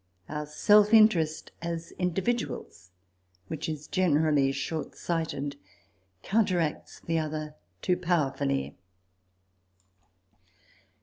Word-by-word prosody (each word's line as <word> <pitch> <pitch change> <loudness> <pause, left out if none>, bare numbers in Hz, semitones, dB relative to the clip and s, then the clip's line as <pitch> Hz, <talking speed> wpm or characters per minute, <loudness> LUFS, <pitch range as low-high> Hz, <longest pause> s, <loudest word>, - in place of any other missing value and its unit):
Our 150 0 -4
self 210 +7 +5
interest, 170 -8 +4
as 170 0 -4
individuals, 180 - -2 0.6
which 160 0 -4
is 155 -1 -5
generally 150 -6 +2
shortsighted, 145 0 -3 0.7
coun 215 +2 +3
teracts 170 -5 -2
the 165 -1 +1
other 155 -1 -4 0.3
too 180 - +2
powerfully. 140 -6 0
160 Hz, 80 wpm, -28 LUFS, 150-180 Hz, 0.7 s, self